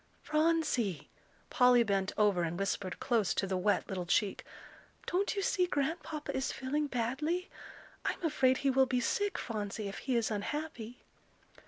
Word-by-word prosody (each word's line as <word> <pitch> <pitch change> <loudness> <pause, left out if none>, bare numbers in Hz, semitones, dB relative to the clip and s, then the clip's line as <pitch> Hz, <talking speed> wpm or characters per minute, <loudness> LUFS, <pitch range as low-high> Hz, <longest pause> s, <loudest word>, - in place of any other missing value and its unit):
"Phronsie," 305 - +1 0.4
Polly 250 -3 +6
bent 195 -3 0
over 205 -4 +3
and 170 0 -2
whispered 195 -1 -2
close 225 -6 +1
to - - +1
the 190 -1 -2
wet 200 +3 +1
little 180 -3 -4
cheek, 195 +2 +1 0.6
"don't 390 +4 0
you 395 - -1
see 365 -2 +2
Grandpapa 305 0 -2
is 265 - -1
feeling 290 +3 -1
badly? 280 +9 -2 0.5
I'm - - -2
afraid 265 -5 +3
he 275 - +1
will 265 0 +4
be 255 -1 +1
sick, 400 - 0
Phronsie, 210 -2 -4
if 195 - -6
he 260 -2 -1
is 230 -1 +1
unhappy." 245 +1 -4
250 Hz, 155 wpm, -32 LUFS, 205-300 Hz, 0.6 s, Polly